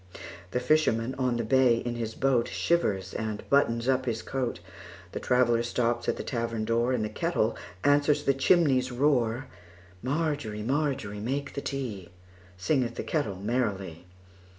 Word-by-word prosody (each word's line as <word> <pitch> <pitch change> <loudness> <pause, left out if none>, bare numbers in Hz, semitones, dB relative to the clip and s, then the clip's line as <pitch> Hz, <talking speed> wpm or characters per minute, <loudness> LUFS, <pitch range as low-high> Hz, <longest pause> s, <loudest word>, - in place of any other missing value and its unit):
The 125 - -1
fisherman 125 -3 +2
on 125 -2 +1
the 120 - -1
bay 125 +1 +4
in 120 0 -3
his 115 -2 -4
boatShivers 125 - +1
and 110 -2 -4
buttons 115 -4 +3
up 130 -1 +1
his 115 -2 -2
coat; 130 -3 -2 0.5
The - - -4
traveller 120 -2 +3
stops 120 0 0
at - - 0
the - - -4
tavern 115 -3 -2
door, 115 +2 +1
And 120 -4 0
the - - -1
kettle - - 0 0.3
answers 145 +1 +3
the 140 - +3
chimney's 135 -3 +3
roar. 125 -2 +1 0.6
Margery, 140 -7 -2
Margery, 130 -5 -1
make 140 +6 -3
the 140 - -4
tea, 120 -12 -4 0.5
Singeth 120 +3 0
the - - -4
kettle 145 - -1
merrily. 95 -5 -2
120 Hz, 150 wpm, -28 LUFS, 115-135 Hz, 0.6 s, bay